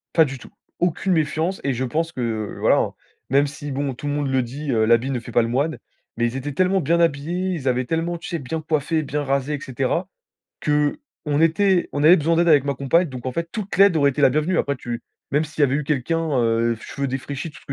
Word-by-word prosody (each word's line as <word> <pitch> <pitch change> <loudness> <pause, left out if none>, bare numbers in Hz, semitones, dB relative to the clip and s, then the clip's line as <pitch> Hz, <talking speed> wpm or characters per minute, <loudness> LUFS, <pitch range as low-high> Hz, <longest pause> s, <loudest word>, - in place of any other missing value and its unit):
Pas 160 - +6
du 135 -2 -6
tout. - - -13 0.3
Aucune 180 +2 +1
méfiance 160 +3 0
et 140 - 0
je 125 +2 -2
pense 160 +6 -1
que, 130 - -5
heu, 110 -3 -3
voilà - - +4
hein, - - 0 0.4
même 140 +2 +4
si 145 0 -7
bon, 140 0 -2
tout 135 +4 -7
le 145 - -1
monde 145 -1 -1
le 130 -1 +2
dit: 135 +4 -5
«Heu, 110 -2 +2
l'habit 115 +4 +3
ne 130 - -1
fait 120 +1 -10
pas 120 - +4
le - - -1
moine.», 140 +7 0 0.4
mais 120 - +1
ils 120 +2 -2
étaient 135 +2 -4
tellement 185 +4 +2
bien 170 +4 +2
habillés. 170 +4 0
Ils 145 -6 -4
avaient 130 0 +1
tellement 165 +4 -1
tu 170 - -9
sais 170 - -2
bien 155 +4 -4
coiffés, 155 +1 0
bien 145 +1 -2
rasés, 140 +1 -1
et - - -6
cetera 135 +7 -2 0.6
qu'on 150 - -1
était 180 +2 +3
on 145 - -1
avait 170 +4 +8
besoin 165 +2 +1
d'aide 170 +1 +3
avec 145 -3 +5
ma 140 -1 -1
compagne. 150 +6 +2
Donc 130 -2 -8
en 130 - -1
fait, 170 +5 -3
toute 210 -3 -4
l'aide 195 -3 +6
aurait 140 -2 +4
été 145 - -3
la 140 - +7
bienvenue. 155 +7 +1
Après, 140 - 0
tu 120 -3 -5 0.3
même 145 +2 +2
s'il 150 0 -4
y - - +7
avait 135 -2 +2
eu 150 - -1
quelqu'un, 150 +2 0
heu, 115 0 +2
cheveux 140 +3 -4
défraîchis, 135 +4 -4
tout 150 - -14
ce - - -23
145 Hz, 255 wpm, -22 LUFS, 130-165 Hz, 0.6 s, avait